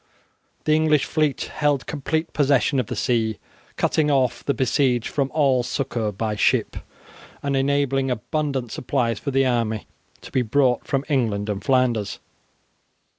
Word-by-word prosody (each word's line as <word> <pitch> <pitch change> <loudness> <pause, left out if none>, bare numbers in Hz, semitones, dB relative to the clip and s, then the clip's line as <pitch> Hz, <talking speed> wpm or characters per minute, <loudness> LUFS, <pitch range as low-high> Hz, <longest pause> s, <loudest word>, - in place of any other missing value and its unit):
The 155 - +2
English 155 -2 +3
fleet 155 -3 0
held 145 -3 +1
complete 155 +3 -2
possession 140 -1 +2
of 125 - -1
the - - -4
sea, 115 -4 0 0.4
cutting 150 -1 +1
off 130 -3 +1
the 140 - 0
besieged 125 -1 +1
from 140 -2 -1
all 140 -5 +3
succour 120 -4 -2
by 105 +2 -2
ship, - - +1 0.7
and 140 -1 0
enabling 135 -1 +1
abundant 130 0 -2
supplies 120 -4 -1
for 145 - -4
the 135 0 +2
army 115 -4 0 0.4
to - - -11
be 130 - +2
brought 125 +1 +1
from 135 0 -1
England 110 -8 0
and 100 -1 -3
Flanders. 125 -6 +1
130 Hz, 145 wpm, -23 LUFS, 120-140 Hz, 0.7 s, English